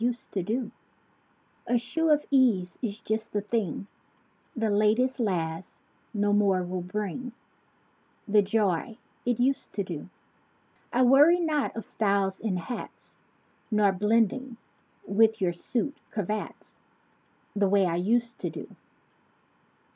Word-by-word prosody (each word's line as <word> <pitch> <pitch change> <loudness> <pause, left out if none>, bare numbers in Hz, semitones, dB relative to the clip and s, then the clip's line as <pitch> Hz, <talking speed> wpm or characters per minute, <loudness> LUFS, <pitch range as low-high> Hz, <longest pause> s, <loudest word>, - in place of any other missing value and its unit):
used 240 +1 -2
to 195 - -1
do 225 +5 -2 1.0
45 245 - +2
A - - +6
shoe 320 +7 0
of 300 -1 +3
ease, 230 -10 +3
is 220 -2 -4
just 220 0 -2
the 205 - 0
thing; 205 -4 -2 0.7
The 225 -3 0
"latest 220 +6 +2
last" 175 -5 -2 0.3
no 205 -2 +1
more 195 -3 +3
will 180 0 -3
bring 210 +7 -4 0.9
The 210 0 +5
joy 205 +1 0 0.3
it 245 -1 +1
used 265 +2 0
to 200 - -1
do. 170 -3 -7 0.8
I 255 - +3
worry 290 +7 +6
not 310 -4 0
of 225 - -5
styles 200 -2 0
in 205 -5 -1
hats; 180 +8 -7 0.5
Nor 210 -2 +4
blending 230 +5 +1 0.5
with 220 +2 +3
your 180 -3 +1
suit 250 - -2
cravats 210 +1 -5 0.8
The 200 -1 +2
way 200 -1 +4
I 170 -1 0
used 235 +6 0
to - - -2
do. - - -9
215 Hz, 130 wpm, -27 LUFS, 195-245 Hz, 1.0 s, A